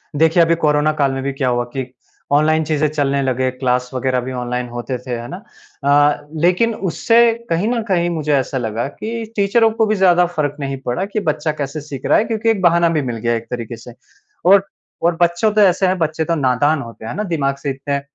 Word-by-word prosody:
देखिए 160 +3 +4
अभी 165 +1 +2
कोरोना 150 +1 +3
काल 135 - +2
में 135 0 -3
भी 140 0 -2
क्या 135 -2 -1
हुआ 120 0 0
कि 130 -1 -2 0.5
ऑनलाइन 155 +2 +3
चीज़ें 155 0 +1
चलने 140 -2 0
लगे, 130 -1 0
क्लास 125 -1 -1
वग़ैरह 130 0 0
भी 130 +1 -6
ऑनलाइन 125 0 -3
होते 120 +1 -4
थे, 125 +1 -9
है 120 +1 -6
ना? 180 - -6 0.5
अ, 145 +1 +3 0.2
लेकिन 220 +6 +2 0.2
उससे 230 +7 +2 0.3
कहीं 170 +6 0
न 240 -2 0
कहीं 175 -2 +1
मुझे 155 -3 -1
ऐसा 135 0 -1
लगा 115 +1 -2
कि 225 +8 -6
टीचरों 220 +3 +3
को 225 0 +1
भी 215 0 +1
ज़्यादा 180 -2 +4
फ़र्क 155 -5 -2
नहीं 135 -1 -3
पड़ा 150 +11 -1
कि 210 +2 -3
बच्चा 155 +1 -1
कैसे 140 +2 -4
सीख 140 -3 -8
रहा - - +4
है 220 - +2
क्योंकि 225 0 -1
एक 210 -4 +1
बहाना 170 -1 +4
भी 155 -3 0
मिल 115 - -5
गया 120 +1 0
एक 115 0 -5
तरीके 120 -1 -5
से। 115 +1 -12 0.5
और 195 +1 +5 0.4
और 170 0 +2
बच्चों 175 +5 +2
तो 215 - +3
ऐसे 190 -1 +4
हैं, 185 0 +1
बच्चे 160 0 0
तो 170 - 0
नादान 145 +2 +1
होते 115 -1 -10
हैं 115 - -5
ना 210 - -2
दिमाग 145 -7 -1
से 140 0 -4
इतने 140 +1 -3
150 Hz, 225 wpm, -18 LUFS, 130-175 Hz, 0.5 s, और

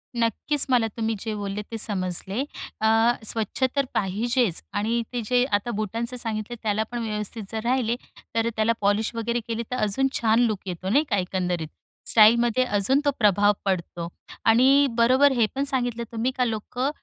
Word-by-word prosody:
नक्कीच, 235 +5 0
मला 240 -3 +3
तुम्ही 225 0 -1
जे 220 +2 -4
बोलले 205 0 -4
ते 225 - -3
समजले. 195 +1 -1 0.4
अ, 220 - +3 0.4
स्वच्छ 225 +3 -2
तर 280 -1 +2
पाहिजेच 215 +1 0
आणि 225 +3 0
ते 245 - -1
जे 250 0 +4
आता 220 +4 -5
बुटांचं 230 +4 -3
सांगितले, 225 0 -3
त्यालापण 220 +3 -1
व्यवस्थित 210 0 -4
जर 220 -1 -3
राहिले, 240 -1 +1 0.4
तर 230 0 +2
त्याला 220 +1 +2
पॉलिश 205 +3 +1
वगैरे 235 +1 -1
केली, 230 0 -2
तर - - 0
अजून 270 +7 +1
छान 225 0 +2
लूक 210 -3 -2
येतो 185 +1 -4
नाही 280 +9 +4
का, 205 - +1
एकंदरीत 180 -3 -2 0.4
स्टाईलमध्ये 235 +2 +5
अजून 235 +8 +3
तो 285 - +4
प्रभाव 205 -1 +4
पडतो. 175 -3 -2 0.4
आणि 265 +5 +5
बरोबर 260 +4 +5
हे 240 -4 +3
पण 275 - 0
सांगितलं 245 -4 -1
तुम्ही 230 +3 -1
का 250 - +2
लोकं 245 +4 -2
225 Hz, 165 wpm, -24 LUFS, 205-245 Hz, 0.4 s, स्टाईलमध्ये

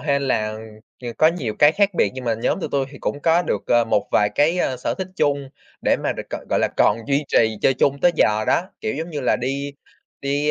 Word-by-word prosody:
hên 140 -2 0
là, 110 -5 -1 0.5
ờ, 120 - -5
có 155 - +6
nhiều 140 -11 -3
cái 145 +1 +7
khác 200 -1 +1
biệt - - +2
nhưng 130 -1 -7
mà 115 - +1
nhóm 115 - -1
tụi - - -3
tui 135 -1 0
thì 140 - -12
cũng 145 - -3
có 165 +3 +3
được, 105 - -2
ờ, 120 0 +3
một 105 -3 0
vài 105 - +3
cái, 165 +5 +2
ơ, 130 -6 0
sở 125 - -3
thích 190 - -4
chung, 140 -3 0 0.3
để - - +3
mà - - -2
được - - -9
gọi - - -5
gọi - - +2
là - - +2
còn 105 - +4
duy 140 +2 +1
trì 110 -1 +2
chơi 135 - +4
chung 140 +2 +1
tới 175 - +4
giờ 110 -4 +2
đó. - - +2 0.2
Kiểu, 110 - -2
giống 160 +4 -5
như 150 -3 -4
là 125 - +2
đi 140 +3 -3 0.5
đi 145 +2 0
140 Hz, 255 wpm, -21 LUFS, 120-150 Hz, 0.5 s, cái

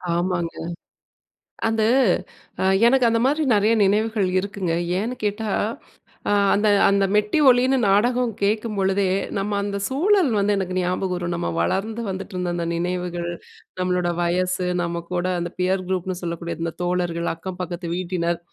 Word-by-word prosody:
ஆமாங்க. 175 -1 -1 1.1
அந்த 225 0 +1 0.8
அ - - +1 0.2
எனக்கு 260 0 +4
அந்த 230 0 +1
மாரி 295 +4 +2
நிறைய 210 +2 +3
நினைவுகள் 210 0 +1
இருக்குங்க. 190 -3 -3 0.3
ஏன்னு 235 +4 -3
கேட்டா, 210 +1 -1 0.8
அ - - +3 0.2
அந்த 210 +1 +2 0.2
அந்த 200 0 +3
மெட்டி 210 +7 +2
ஒலின்னு 255 +1 +4
நாடகம் 240 +4 +2
கேட்கும்பொழுதே, 200 -2 +1 0.3
நம்ம 205 +1 -1
அந்த 200 0 -3
சூழல் 345 +3 +3
வந்து 205 +1 +2
எனக்கு 185 -1 -2
ஞாபகம் 180 +1 -1
வரும். 175 0 -3
நம்ம 170 - -2
வளர்ந்து 210 - -1
வந்துட்டுருந்த 185 -1 -4
அந்த 170 -1 -2
நினைவுகள், 175 0 -2 0.5
நம்மளோட 180 -1 0
வயசு, 180 +1 0 0.2
நம்ம 170 0 -3
கூட 175 0 0
அந்த 175 0 -3
பியர் 185 +1 +1
குரூப்னு 185 -1 -2
சொல்லக்கூடிய 170 0 -4
இந்த 165 -1 -2
தோழர்கள், 175 -1 -1
அக்கம் 180 +2 -7
பக்கத்து 175 0 -5
வீட்டினர், 175 -2 -1
190 Hz, 140 wpm, -22 LUFS, 175-210 Hz, 1.1 s, எனக்கு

